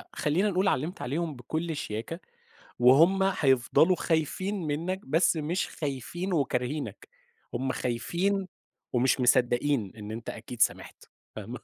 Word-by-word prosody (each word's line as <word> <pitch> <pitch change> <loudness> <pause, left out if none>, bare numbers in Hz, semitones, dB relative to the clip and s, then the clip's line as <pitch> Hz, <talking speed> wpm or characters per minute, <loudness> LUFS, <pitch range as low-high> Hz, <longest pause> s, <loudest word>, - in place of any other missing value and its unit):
خلينا 175 +8 +1
نقول- 190 0 +1
علمت 160 +9 -2
عليهم 155 +3 -2
بكل 160 +7 -3
شياكة، 115 +6 -5 0.6
وهُم 155 +10 +6 0.2
هيفضلوا 135 +6 +4
خايفين 180 +5 -1
منك، 170 +6 -2
بس 160 +4 +2
مش 165 +5 -1
خايفين 160 +6 -4
وكارهينك، 135 - -2 0.4
هُم 130 +2 -1
خايفين 180 +11 -1 0.5
ومش 125 +2 +2
مصدقين 125 -2 +2
إن 105 -1 -8
أنت 115 +1 -6
أكيد 115 +1 -7
سامحت - - 0 0.3
فاهمة. - - -7
150 Hz, 120 wpm, -28 LUFS, 125-175 Hz, 0.6 s, وهُم